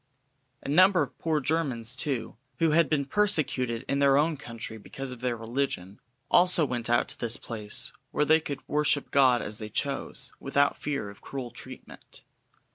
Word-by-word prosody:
A - - -7
number 180 +3 +5
of 135 - -8
poor 160 -2 +1
Germans, 130 -6 -1
too, 130 -3 -3 0.2
who 165 -2 +3
had 165 +1 +4
been 145 -3 +1
persecuted 135 - 0
in 140 - 0
their 140 -1 +5
own 155 +2 +2
country 115 -5 -8
because 135 +5 -6
of 125 -1 -9
their 125 -2 -1
religion, 115 -5 -3 0.3
also 175 -3 +5
went 120 -3 -3
out 120 - +3
to - - -3
this 120 -1 +2
place 105 -3 -4 0.2
where 150 - +1
they 155 +2 +5
could 145 -3 -6
worship 150 -1 +1
God 130 -3 +4
as 105 +1 -5
they 110 -1 -6
chose, 135 +2 -3
without 140 +1 +2
fear 140 -9 -3
of 100 - -17
cruel 130 -3 -6
treatment. - - -11
135 Hz, 175 wpm, -28 LUFS, 120-150 Hz, 0.3 s, number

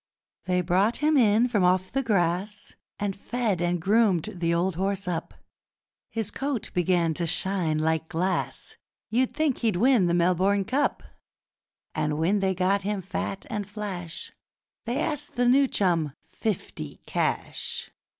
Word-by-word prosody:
They 180 0 +1
brought 190 +6 +2
him 305 +1 +2
in 230 -2 +5
from 210 -6 +1
off 185 +1 +2
the 270 - +1
grass 200 -2 -1 0.2
And 200 -2 -2
fed 215 -3 -1
and 175 0 +1
groomed 200 -2 +2
the 170 -2 -1
old 175 +3 +1
horse 195 +1 -1
up; 170 -2 -3 0.7
His 225 -3 -3
coat 275 -4 -3
began 175 -2 +2
to 170 +2 -1
shine 180 -3 0
like 160 +1 0
glass 180 +3 -2 0.3
You'd 250 +3 +1
think 305 -4 +1
he'd 220 -5 +1
win 230 -1 +4
the 170 - +2
Melbourne 185 +3 +2
Cup. 275 +7 0 0.9
And 150 -1 -1
when 180 +6 +2
they'd 190 -2 0
got 195 +2 +2
him 200 -1 -2
fat 195 0 -4
and 205 -1 -4
flash 195 -6 -6 0.5
They 240 +3 -1
asked 300 -2 -1
the 245 0 +2
new 270 +3 +5
chum 170 - +1
fifty 185 - -4
cash! - - -2
195 Hz, 150 wpm, -26 LUFS, 175-220 Hz, 0.9 s, in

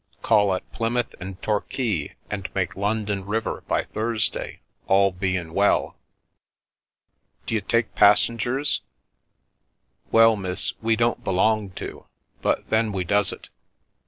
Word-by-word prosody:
Call 105 -4 +4
at 95 - -6
Plymouth 115 +1 -1
and 95 +1 -7
Torquay, 105 - -1 0.2
and 100 -2 -3
make 95 +1 -1
London 105 0 -1
river 110 +3 -3
by - - +1
Thursday, 110 +1 -2 0.3
all 100 0 +4
bein' 90 -3 -2
well." 100 +2 +2 0.7
" - - -47
D'you 110 -2 -1
take 115 +2 0
passengers? 115 +6 +3 0.6
" - - -43
"Well, 115 0 +6
miss, 95 -3 -2
we 115 0 +2
don't 120 +1 0
belong 105 +2 +1
to, - - -8 0.3
but - - -1
then 110 0 +2
we 95 -2 -2
does 100 +3 +2
it. - - -10
105 Hz, 130 wpm, -24 LUFS, 95-115 Hz, 0.7 s, Well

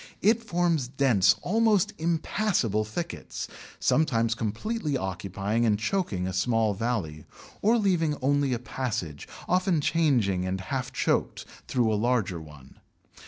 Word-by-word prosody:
It 220 +3 +4
forms 170 - +1
dense, 130 -7 +3
almost 215 -1 +2
impassable 160 - 0
thickets, 165 +11 -5 0.3
sometimes 115 -7 +2
completely 140 - -2
occupying 95 +2 -2
and 110 -3 +3
choking 110 - -1
a 95 - -3
small 110 +2 +1
valley, 95 -9 -2 0.4
or 225 +4 +4
leaving 170 -8 +1
only 140 0 +1
a 125 - +1
passage, 110 - -4 0.2
often 185 -2 +2
changing 130 - +2
and 95 +1 -2
half 130 +6 -3
choked, - - 0 0.2
through 115 -4 +1
a 105 - 0
larger 110 -8 0
one. 75 -4 -14
125 Hz, 125 wpm, -27 LUFS, 100-165 Hz, 0.4 s, It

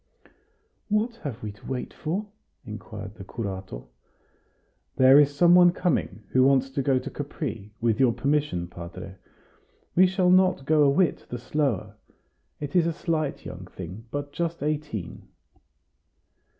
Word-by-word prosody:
"What 220 +3 0
have 130 - -7
we 105 - -4
to 105 - -18
wait 130 -2 -4
for?" 180 +7 -3 0.4
inquired 95 - -8
the 105 - -10
curato. 95 - -6 1.1
"There 130 +2 +7
is 145 -1 +3
some 175 +3 +6
one 175 0 +7
coming 170 - -1
who 130 - +4
wants 135 0 +3
to 135 - -1
go 135 0 +2
to - - -4
Capri 140 - -5
with 115 -2 +1
your 130 -3 +5
permission, 140 -10 0
padre. 90 +2 -9 0.8
We 185 +1 +7
shall 185 -1 +2
not 185 -6 +4
go 155 +1 +4
a 145 - +6
whit 175 +5 +1
the 120 - -4
slower. 135 -4 -2 0.6
It 145 +1 -6
is 170 -2 +4
a 170 - 0
slight 155 -4 -2
young 90 0 -8
thing, 95 +5 -9
but 145 +1 -5
just 170 -1 -2
eighteen." 150 - -4
140 Hz, 150 wpm, -26 LUFS, 110-165 Hz, 1.1 s, There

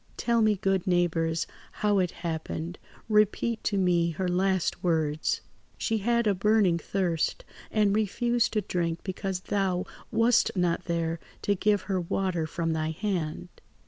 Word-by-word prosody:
"Tell 235 -1 +2
me, 215 -1 +4
good 195 -1 0
neighbours, 165 -2 +1 0.3
how 205 -1 +2
it 180 -1 +2 0.2
happened; 165 +1 -4 0.3
repeat 215 +1 +2
to 205 - +1
me 175 -3 +3
her 180 +3 -2
last 185 0 0
words. 160 -3 0 0.4
"She 225 -2 0
had 235 +3 +1
a 205 - +3
burning 195 -3 +3
thirst, 175 -3 -1 0.2
and 210 -2 +2
refused 235 +3 +1
to 215 - +2
drink 170 -3 -2
because 190 -1 -3
thou 190 -2 0 0.3
wast 235 +1 +4
not 175 0 +1
there 165 -1 -1 0.2
to 205 - +2
give 205 0 +1
her 190 -2 -1
water 175 -2 -1
from 165 0 -1
thy 155 0 -1
hand. 160 - -3
185 Hz, 145 wpm, -28 LUFS, 170-210 Hz, 0.4 s, me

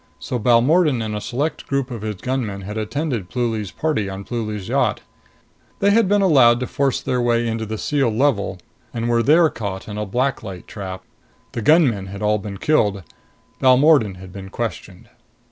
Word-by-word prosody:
So 125 - -4
Balmordan 130 +6 +3
and 105 -1 -3
a 105 - -4
select 145 +9 -3
group 140 -2 -1
of 115 -3 -5
his 105 -1 -3
gunmen 110 -2 -3
had 105 +2 -7
attended 110 - -3
Pluly's 115 -4 -2
party 150 -9 -1
on 95 +1 -6
Pluly's 105 -4 -4
yacht. - - +1 0.8
They 200 +1 +3
had 225 0 +4
been 205 0 +3
allowed 130 -9 +5
to - - 0
force 135 0 0
their 125 -1 -1
way 120 -1 +1
into 110 -1 -3
the 110 +1 -4
sealed 135 -3 0
level 110 -7 +1 0.4
and 115 0 -2
were 120 0 +2
there 160 +6 +5
caught 100 -4 -5
in 105 0 -5
a 105 - -3
black 130 +6 0
light 95 -5 -8
trap. 95 -3 -7 0.5
The 115 - -4
gunmen 120 - +3
had 100 +2 -8 0.2
been 100 -1 -6
killed. 105 - +1 0.6
Balmordan 130 -5 +5
had 90 0 -12
been 95 -1 -8
questioned. 105 -4 -6
115 Hz, 180 wpm, -21 LUFS, 100-135 Hz, 0.8 s, allowed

